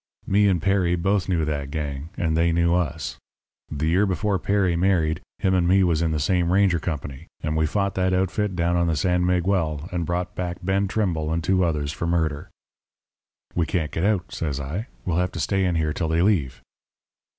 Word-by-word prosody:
"Me 100 Hz, +1 st, +3 dB
and 90 Hz, -5 st, +1 dB
Petty 95 Hz, -3 st, +2 dB
both 95 Hz, +2 st, 0 dB
knew 85 Hz, -4 st, +1 dB
that 70 Hz, -2 st, -3 dB
gang, 75 Hz, 0 st, -4 dB
and 80 Hz, -2 st, 0 dB
they 85 Hz, +1 st, +3 dB
knew 85 Hz, 0 st, +2 dB
us. 90 Hz, -6 st, -2 dB, 0.5 s
The 75 Hz, 0 st, -2 dB
year 95 Hz, +5 st, +3 dB
before 95 Hz, +1 st, 0 dB
Perry 100 Hz, -4 st, +1 dB
married, 85 Hz, -3 st, +1 dB, 0.2 s
him 95 Hz, -, +1 dB
and 90 Hz, -2 st, +2 dB
me 95 Hz, +2 st, +4 dB
was 85 Hz, -3 st, +2 dB
in 85 Hz, -, +1 dB
the 80 Hz, -1 st, -1 dB
same 85 Hz, +3 st, +1 dB
ranger 95 Hz, -3 st, +3 dB
company 75 Hz, -2 st, -5 dB, 0.2 s
and 75 Hz, 0 st, -1 dB
we 80 Hz, 0 st, +2 dB
fought 100 Hz, +3 st, 0 dB
that 95 Hz, 0 st, +1 dB
outfit 95 Hz, +2 st, 0 dB
down 85 Hz, 0 st, +1 dB
on 85 Hz, 0 st, +2 dB
the 80 Hz, -, +1 dB
San 90 Hz, +4 st, +1 dB
Miguel, 90 Hz, -4 st, 0 dB
and 85 Hz, -3 st, -2 dB
brought 90 Hz, +1 st, -2 dB
back 90 Hz, -1 st, -4 dB
Ben 95 Hz, +2 st, +1 dB
Trimble 85 Hz, -7 st, -1 dB
and 80 Hz, 0 st, -1 dB
two 95 Hz, +2 st, +2 dB
others 75 Hz, -4 st, -1 dB
for 85 Hz, -, -4 dB
murder. 80 Hz, -4 st, -1 dB, 1.0 s
"'We 85 Hz, -, +1 dB
can't 80 Hz, -2 st, -1 dB
get 80 Hz, -, -2 dB
out,' 95 Hz, -3 st, 0 dB
says 75 Hz, -4 st, -3 dB
I. 80 Hz, -, -4 dB, 0.2 s
'We'll 85 Hz, -2 st, 0 dB
have 90 Hz, 0 st, 0 dB
to -, -, -5 dB
stay 95 Hz, -1 st, +1 dB
in 90 Hz, -2 st, +1 dB
here 80 Hz, -2 st, 0 dB
till 80 Hz, -, -2 dB
they 80 Hz, +2 st, +2 dB
leave.' 75 Hz, -11 st, 0 dB
85 Hz, 205 wpm, -24 LUFS, 80-95 Hz, 1.0 s, me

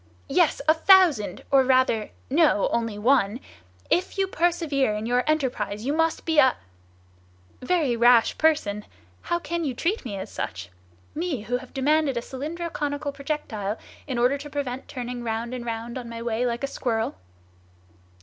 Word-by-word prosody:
"Yes, -, -, +2 dB
a 315 Hz, -, +7 dB
thousand; 330 Hz, -, +4 dB
or 270 Hz, -1 st, +6 dB
rather, 255 Hz, -4 st, +2 dB, 0.2 s
no, 295 Hz, -, +3 dB
only 230 Hz, -3 st, -1 dB
one! 230 Hz, -1 st, +2 dB, 0.5 s
If 360 Hz, +3 st, +1 dB
you 390 Hz, -, +2 dB
persevere 325 Hz, -, 0 dB
in 210 Hz, +1 st, -4 dB
your 245 Hz, +1 st, +1 dB
enterprise, 245 Hz, -8 st, -1 dB
you 280 Hz, -, 0 dB
must 325 Hz, +1 st, 0 dB
be 320 Hz, -2 st, +3 dB
a—" 260 Hz, -2 st, +5 dB, 1.1 s
"Very 285 Hz, -3 st, +1 dB
rash 235 Hz, 0 st, +5 dB
person! 215 Hz, -11 st, +1 dB, 0.4 s
How 345 Hz, -, -1 dB
can 340 Hz, +1 st, -3 dB
you 270 Hz, -5 st, -2 dB
treat 365 Hz, -, -1 dB
me 210 Hz, -6 st, -5 dB
as 190 Hz, -, -7 dB
such? 90 Hz, -1 st, -5 dB, 0.4 s
me, 315 Hz, -7 st, -2 dB
who 240 Hz, +4 st, -1 dB
have 255 Hz, 0 st, -12 dB
demanded 290 Hz, 0 st, +1 dB
a -, -, 0 dB
cylindro 320 Hz, +7 st, -5 dB
conical 285 Hz, 0 st, -2 dB
projectile, 275 Hz, -8 st, -4 dB, 0.3 s
in 260 Hz, -3 st, -3 dB
order 250 Hz, +4 st, +2 dB
to 295 Hz, +1 st, -8 dB
prevent 270 Hz, -3 st, -4 dB
turning 245 Hz, -2 st, -5 dB
round 230 Hz, +1 st, -3 dB
and 240 Hz, -1 st, -5 dB
round 230 Hz, +2 st, -4 dB
on 240 Hz, -2 st, -8 dB
my 230 Hz, 0 st, -6 dB
way 235 Hz, +1 st, 0 dB
like 235 Hz, +2 st, -3 dB
a -, -, +1 dB
squirrel?" 225 Hz, -5 st, -2 dB
260 Hz, 165 wpm, -25 LUFS, 235-305 Hz, 1.1 s, a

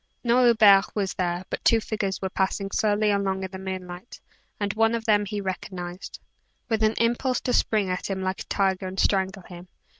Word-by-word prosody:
No 245 Hz, +1 st, +3 dB
Hubert 210 Hz, -4 st, +5 dB
was 200 Hz, -3 st, -1 dB
there, 175 Hz, 0 st, -2 dB
but -, -, -4 dB
two 230 Hz, -, +4 dB
figures 205 Hz, -3 st, -3 dB
were 190 Hz, -, -1 dB
passing 195 Hz, +1 st, -1 dB
slowly 210 Hz, 0 st, +1 dB
along 195 Hz, -1 st, -1 dB
in 190 Hz, -, -5 dB
the 190 Hz, -, -7 dB
moonlight, 185 Hz, +2 st, -7 dB, 0.4 s
and 200 Hz, -1 st, -1 dB
one 225 Hz, +1 st, +2 dB
of 225 Hz, -1 st, -4 dB
them 210 Hz, -2 st, +3 dB
he 205 Hz, +1 st, -4 dB
recognized, 185 Hz, -2 st, -6 dB, 0.5 s
with 220 Hz, -1 st, 0 dB
an 220 Hz, 0 st, +2 dB
impulse 240 Hz, +2 st, +1 dB
to 250 Hz, -, -1 dB
spring 215 Hz, -5 st, +2 dB
at 185 Hz, +1 st, -3 dB
him 190 Hz, -1 st, -3 dB
like 185 Hz, +1 st, -2 dB
a -, -, -7 dB
tiger 190 Hz, -1 st, 0 dB
and 185 Hz, +1 st, -6 dB
strangle 190 Hz, -1 st, +1 dB
him. 175 Hz, 0 st, -12 dB
195 Hz, 200 wpm, -25 LUFS, 190-215 Hz, 0.5 s, Hubert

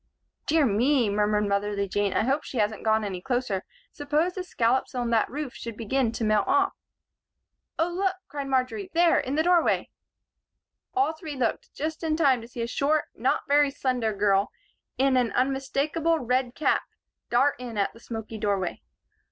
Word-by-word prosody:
"Dear 315 Hz, -1 st, +4 dB
me!" 240 Hz, +1 st, +2 dB
murmured 210 Hz, 0 st, +1 dB
motherly 200 Hz, 0 st, 0 dB
Jean. 205 Hz, +1 st, 0 dB
"I -, -, +1 dB
hope 275 Hz, +5 st, +1 dB
she 260 Hz, -, -7 dB
hasn't 215 Hz, -1 st, 0 dB
gone 220 Hz, 0 st, +2 dB
any 190 Hz, -3 st, -4 dB
closer. 245 Hz, -5 st, -1 dB, 0.3 s
Suppose 300 Hz, +5 st, 0 dB
the 370 Hz, -, -4 dB
scallops 255 Hz, -7 st, 0 dB
on 240 Hz, -1 st, -1 dB
that 225 Hz, -2 st, +2 dB
roof 290 Hz, -2 st, -5 dB
should 230 Hz, -2 st, -7 dB
begin 235 Hz, +1 st, 0 dB
to 230 Hz, -, -3 dB
melt 215 Hz, -1 st, +2 dB
off." 385 Hz, +1 st, +3 dB, 1.0 s
"Oh, 325 Hz, -, +2 dB
look!" 375 Hz, +2 st, 0 dB
cried 285 Hz, -1 st, -5 dB
Marjory. 270 Hz, +10 st, -1 dB
"There! 340 Hz, 0 st, +5 dB
In 265 Hz, +2 st, -2 dB
the 315 Hz, -, +2 dB
doorway!" 350 Hz, -1 st, +2 dB, 1.0 s
All 385 Hz, -4 st, +2 dB
three 315 Hz, -2 st, -7 dB
looked 245 Hz, -4 st, -2 dB
just 315 Hz, +2 st, -3 dB
in 310 Hz, -1 st, 0 dB
time 270 Hz, -7 st, +3 dB
to 230 Hz, -, -10 dB
see 240 Hz, -1 st, -5 dB
a -, -, -2 dB
short, 290 Hz, +5 st, 0 dB
not 255 Hz, +4 st, 0 dB
very 290 Hz, 0 st, +4 dB
slender 255 Hz, -5 st, -1 dB
girl 200 Hz, -1 st, +2 dB, 0.5 s
in 270 Hz, 0 st, +3 dB
an 245 Hz, -2 st, +2 dB
unmistakable 275 Hz, +5 st, 0 dB
red 250 Hz, -2 st, -1 dB
cap 310 Hz, -, +2 dB, 0.5 s
dart 265 Hz, +4 st, +3 dB
in 240 Hz, -3 st, -6 dB
at 200 Hz, -, 0 dB
the 230 Hz, -, -15 dB
smoky 225 Hz, -2 st, -7 dB
doorway. 200 Hz, -4 st, -1 dB
255 Hz, 175 wpm, -26 LUFS, 220-295 Hz, 1.0 s, There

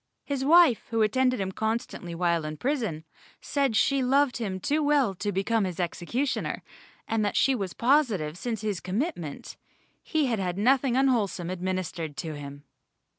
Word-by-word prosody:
His 280 Hz, -2 st, -2 dB
wife, 320 Hz, -4 st, +5 dB
who 225 Hz, -1 st, +2 dB
attended 255 Hz, +3 st, +2 dB
him 190 Hz, -1 st, -2 dB
constantly 220 Hz, -5 st, -3 dB
while 170 Hz, -1 st, +1 dB
in 155 Hz, 0 st, -5 dB
prison, 225 Hz, -, -2 dB, 0.4 s
said 275 Hz, -5 st, 0 dB
she 275 Hz, +4 st, +3 dB
loved 270 Hz, 0 st, +2 dB
him 195 Hz, -6 st, -3 dB
too 295 Hz, -, 0 dB
well 290 Hz, -8 st, +3 dB
to 205 Hz, +3 st, -3 dB
become 205 Hz, +3 st, +1 dB
his 185 Hz, -3 st, -4 dB
executioner, 230 Hz, -, -2 dB, 0.4 s
and 220 Hz, -1 st, 0 dB
that 205 Hz, -, 0 dB
she 270 Hz, -, +4 dB
was 195 Hz, -7 st, -3 dB
positive 230 Hz, -, +2 dB
since 225 Hz, +2 st, -4 dB
his 210 Hz, -4 st, -2 dB
commitment, 185 Hz, -, -4 dB, 0.4 s
he 310 Hz, -2 st, 0 dB
had 235 Hz, -5 st, 0 dB
had 180 Hz, -1 st, -2 dB
nothing 255 Hz, +3 st, +3 dB
unwholesome 210 Hz, -10 st, +1 dB
administered 180 Hz, -4 st, -3 dB
to 160 Hz, -2 st, -4 dB
him. 145 Hz, 0 st, -9 dB
215 Hz, 160 wpm, -27 LUFS, 180-260 Hz, 0.4 s, wife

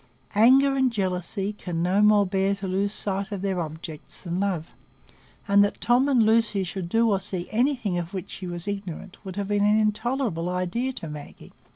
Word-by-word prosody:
Anger 265 Hz, +6 st, +5 dB
and 265 Hz, -2 st, +2 dB
jealousy 195 Hz, 0 st, -2 dB
can 175 Hz, -5 st, -4 dB
no 185 Hz, +3 st, +2 dB
more 210 Hz, -1 st, +5 dB
bear 195 Hz, +1 st, +1 dB
to 195 Hz, 0 st, -5 dB
lose 195 Hz, +2 st, 0 dB
sight 200 Hz, 0 st, -3 dB
of 200 Hz, -2 st, -4 dB
their 190 Hz, -3 st, 0 dB
objects 160 Hz, -1 st, -7 dB
than 175 Hz, 0 st, -3 dB
love, 185 Hz, -5 st, -2 dB, 0.8 s
and 200 Hz, 0 st, +6 dB
that 205 Hz, -, -1 dB
Tom 250 Hz, +4 st, +3 dB
and 250 Hz, -5 st, +4 dB
Lucy 220 Hz, -3 st, +2 dB
should 180 Hz, -1 st, -5 dB
do 225 Hz, +2 st, +3 dB
or 195 Hz, -, +2 dB
see 185 Hz, -2 st, -2 dB
anything 235 Hz, -6 st, +1 dB
of 170 Hz, 0 st, -5 dB
which 190 Hz, -3 st, -6 dB
she 185 Hz, -, -7 dB
was 175 Hz, +1 st, -5 dB
ignorant 195 Hz, -1 st, -6 dB
would 190 Hz, -2 st, -7 dB
have 200 Hz, 0 st, -3 dB
been 205 Hz, 0 st, +2 dB
an 210 Hz, +1 st, +4 dB
intolerable 215 Hz, -4 st, 0 dB
idea 185 Hz, +8 st, -1 dB
to 165 Hz, -, -7 dB
Maggie. 150 Hz, -1 st, -10 dB
200 Hz, 195 wpm, -25 LUFS, 180-215 Hz, 0.8 s, and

